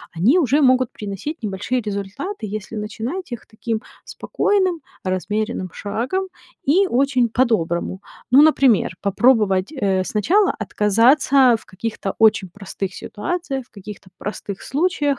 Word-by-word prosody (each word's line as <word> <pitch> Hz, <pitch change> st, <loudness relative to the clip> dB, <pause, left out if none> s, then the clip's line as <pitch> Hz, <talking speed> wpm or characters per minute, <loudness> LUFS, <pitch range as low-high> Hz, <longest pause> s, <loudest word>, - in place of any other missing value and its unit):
они 230 Hz, -, +4 dB
уже 290 Hz, -1 st, +2 dB
могут 255 Hz, -2 st, +3 dB
приносить 210 Hz, -, -6 dB
небольшие 205 Hz, +5 st, -2 dB
результаты, 205 Hz, -, -5 dB
если 215 Hz, +1 st, -6 dB
начинать 235 Hz, -, -5 dB
их 240 Hz, -, -6 dB
таким 220 Hz, 0 st, -4 dB, 0.2 s
спокойным 375 Hz, -5 st, 0 dB, 0.2 s
размеренным 190 Hz, +2 st, -2 dB
шагом 250 Hz, -, -3 dB, 0.4 s
и 365 Hz, +8 st, +4 dB
очень 255 Hz, -4 st, +2 dB
по-доброму. 190 Hz, -7 st, 0 dB, 0.3 s
Ну, 265 Hz, +3 st, +8 dB
например, 265 Hz, -, +4 dB
попробовать, 200 Hz, -1 st, +2 dB
э, 195 Hz, -9 st, 0 dB
сначала 335 Hz, -, +2 dB
отказаться 245 Hz, +4 st, +4 dB
в -, -, -20 dB
каких-то 200 Hz, 0 st, -5 dB
очень 220 Hz, -3 st, +4 dB
простых 195 Hz, 0 st, -6 dB
ситуациях, 275 Hz, -, -4 dB
в -, -, -49 dB
каких-то 200 Hz, -1 st, -11 dB
простых 200 Hz, -1 st, -6 dB
случаях 320 Hz, +2 st, 0 dB
225 Hz, 125 wpm, -20 LUFS, 200-275 Hz, 0.4 s, Ну